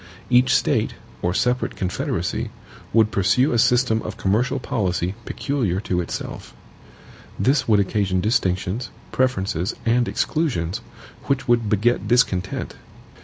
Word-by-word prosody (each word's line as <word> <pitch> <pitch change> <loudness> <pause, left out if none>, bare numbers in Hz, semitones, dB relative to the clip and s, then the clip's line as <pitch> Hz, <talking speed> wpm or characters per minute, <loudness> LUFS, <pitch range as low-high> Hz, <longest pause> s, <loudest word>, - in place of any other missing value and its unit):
Each 125 +1 +5
State, 130 -5 +1 0.3
or 90 - +1
separate 125 +7 0
confederacy, 90 -1 -2 0.4
would 110 -1 +4
pursue 100 +9 +3
a 120 - +2
system 120 -2 +3
of - - -6
commercial 110 +8 +1
policy 95 -7 -1
peculiar 120 -11 -1
to 90 -4 -1
itself. 85 - -6 0.8
This 135 +4 +2
would 105 -3 +4
occasion 95 -1 +1
distinctions, 95 +2 0 0.2
preferences, 95 -9 0
and 120 +1 +2
exclusions, 120 - -1 0.5
which 140 -1 0
would 120 -3 +2
beget 105 0 +1
discontent. 100 -6 +1
110 Hz, 120 wpm, -22 LUFS, 95-125 Hz, 0.8 s, Each